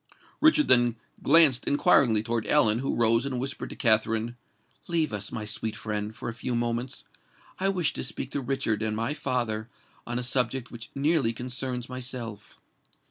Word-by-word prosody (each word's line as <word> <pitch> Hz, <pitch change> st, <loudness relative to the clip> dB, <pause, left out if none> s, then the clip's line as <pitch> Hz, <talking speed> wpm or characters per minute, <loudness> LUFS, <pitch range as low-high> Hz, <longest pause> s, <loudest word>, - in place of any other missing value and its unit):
Richard 315 Hz, -1 st, +4 dB
then 120 Hz, -2 st, +6 dB, 0.3 s
glanced 145 Hz, -5 st, +5 dB
inquiringly 120 Hz, -6 st, +4 dB
towards 115 Hz, -1 st, -2 dB
Ellen, 115 Hz, -7 st, +4 dB
who 135 Hz, -, -2 dB
rose 115 Hz, 0 st, +3 dB
and 135 Hz, -3 st, -3 dB
whispered 135 Hz, +2 st, -5 dB
to -, -, -8 dB
Katherine, 115 Hz, 0 st, +2 dB, 0.5 s
"Leave 160 Hz, -7 st, 0 dB
us, 105 Hz, -1 st, -4 dB
my 105 Hz, -, -4 dB
sweet 105 Hz, +1 st, -3 dB
friend, 105 Hz, 0 st, -4 dB
for -, -, -7 dB
a 115 Hz, -, -3 dB
few 120 Hz, +1 st, -4 dB
moments: 120 Hz, +1 st, -2 dB, 0.6 s
I 195 Hz, +1 st, +1 dB
wish 180 Hz, -6 st, 0 dB
to -, -, -4 dB
speak 130 Hz, +1 st, -5 dB
to 140 Hz, -, -2 dB
Richard 130 Hz, -4 st, -1 dB
and 110 Hz, -1 st, -1 dB
my 115 Hz, +6 st, -1 dB
father 120 Hz, -6 st, -2 dB, 0.4 s
on 120 Hz, 0 st, -3 dB
a 125 Hz, -, -2 dB
subject 125 Hz, 0 st, -1 dB
which 115 Hz, -1 st, -9 dB
nearly 140 Hz, -4 st, +1 dB
concerns 125 Hz, 0 st, -4 dB
myself." 120 Hz, -4 st, -7 dB
120 Hz, 170 wpm, -27 LUFS, 115-135 Hz, 0.6 s, then